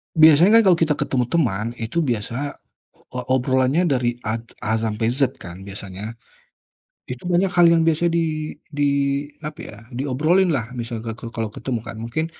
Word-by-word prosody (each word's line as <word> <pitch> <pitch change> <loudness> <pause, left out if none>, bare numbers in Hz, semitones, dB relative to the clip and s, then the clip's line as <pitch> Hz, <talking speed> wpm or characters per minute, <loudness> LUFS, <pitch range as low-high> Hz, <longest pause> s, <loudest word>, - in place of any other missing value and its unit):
Biasanya 160 +8 +7
kan - - +4
kalau 175 - +6
kita 160 -2 +2
ketemu 130 -3 0
teman 115 -7 0
itu 155 +9 -1
biasa 120 +4 -2 0.6
o - - -2
obrolannya 130 +5 +2
dari 125 -3 +1 0.2
A 110 - 0
t 115 0 -12
A 110 +1 0
sampai 110 0 -1
Z 130 +2 0
kan 90 +2 -9
biasanya? 100 +2 -7 1.0
Itu 125 +4 -7
banyak 180 +3 +3
hal 170 -1 +6
yang 165 -1 +4
biasa 165 +2 +2
di 155 -2 -1 0.2
di 145 -2 0 0.6
apa 150 - -9
ya, 105 - -10 0.2
diobrolinlah, 140 -1 +1
misalkan 115 -2 -5
ka 115 -1 -8
kalau 115 -1 -2
ketemu 125 -4 -3
kan. - - -6
Mungkin 125 +8 -2
130 Hz, 165 wpm, -22 LUFS, 115-160 Hz, 1.0 s, Biasanya